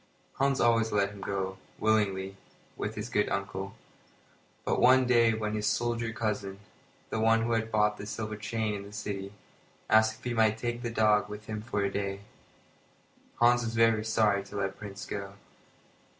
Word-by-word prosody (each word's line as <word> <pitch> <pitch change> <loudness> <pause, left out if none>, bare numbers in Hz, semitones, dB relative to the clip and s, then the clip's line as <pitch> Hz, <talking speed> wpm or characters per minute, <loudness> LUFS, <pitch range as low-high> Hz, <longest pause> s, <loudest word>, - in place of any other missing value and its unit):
Hans 135 0 +2
always 115 -1 +3
let 100 -1 +1
him 100 -1 -11
go, 95 -1 -3 0.2
willingly, 100 -3 +1 0.4
with 105 +1 -4
his 105 +1 -4
good 105 -3 +1
uncle; 100 +1 -3 0.9
but - - +1
one 130 +1 +6
day 115 -2 +4
when 105 -1 -2
his 105 -1 -1
soldier 115 +1 0
cousin 105 -4 -3 0.5
(the 110 - -1
one 115 0 +4
who 120 - -1
had 115 -1 0
bought 105 -1 +2
the 100 - -7
silver 110 0 -4
chain 110 0 -2
in 100 - -4
the 100 +1 -11
city) 100 -2 -5 0.6
asked 110 0 +5
if - - -24
he 125 - -2
might 110 -1 +3
take 120 +1 -3
the 120 - -2
dog 105 -2 +3
with 105 0 -8
him 110 -1 -4
for 105 -2 -2
a 100 - 0
day, 100 0 -3 1.1
Hans 120 +1 +4
was 115 0 -3
very 115 -1 +4
sorry 110 -2 +2
to 100 - -11
let 95 -1 -2
Prince 100 -1 -7
go. 100 -1 -5
110 Hz, 180 wpm, -29 LUFS, 100-115 Hz, 1.1 s, one